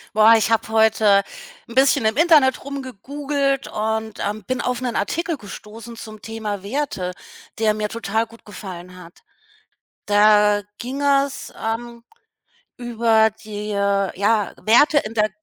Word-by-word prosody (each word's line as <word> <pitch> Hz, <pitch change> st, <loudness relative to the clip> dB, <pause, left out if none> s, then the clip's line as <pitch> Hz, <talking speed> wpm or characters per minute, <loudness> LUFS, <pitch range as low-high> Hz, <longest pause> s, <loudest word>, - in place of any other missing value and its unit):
Boah, 220 Hz, +1 st, +7 dB
ich 225 Hz, -, +1 dB
habe 225 Hz, -1 st, +1 dB
heute 220 Hz, -2 st, +4 dB, 0.5 s
'n 230 Hz, -, -10 dB
bisschen 270 Hz, -1 st, +4 dB
im 220 Hz, +2 st, +1 dB
Internet 300 Hz, -5 st, +4 dB
rumgegoogelt 275 Hz, +1 st, -3 dB
und, 220 Hz, 0 st, -3 dB
ähm, 210 Hz, +1 st, -3 dB
bin 255 Hz, +6 st, -2 dB
auf 250 Hz, -1 st, -2 dB
'nen 250 Hz, -2 st, -3 dB
Artikel 330 Hz, -, -1 dB
gestoßen 225 Hz, +1 st, -10 dB
zum 215 Hz, -2 st, -10 dB
Thema 215 Hz, -3 st, -5 dB
Werte, 200 Hz, -5 st, -3 dB, 0.5 s
der 215 Hz, -1 st, +2 dB
mir 210 Hz, 0 st, -2 dB
total 225 Hz, 0 st, -2 dB
gut 230 Hz, 0 st, -18 dB
gefallen 180 Hz, -3 st, -9 dB
hat. 175 Hz, -1 st, -14 dB, 0.9 s
Da 210 Hz, 0 st, +4 dB, 0.2 s
ging 260 Hz, +4 st, -5 dB
es, 280 Hz, -1 st, 0 dB
ähm, 235 Hz, +1 st, -4 dB, 0.7 s
über 230 Hz, -2 st, +2 dB
die, 215 Hz, -1 st, -8 dB
ja, 200 Hz, +1 st, 0 dB
Werte 290 Hz, +7 st, +4 dB
in 220 Hz, -4 st, -6 dB
der 215 Hz, -1 st, +2 dB
220 Hz, 135 wpm, -21 LUFS, 210-255 Hz, 0.9 s, Boah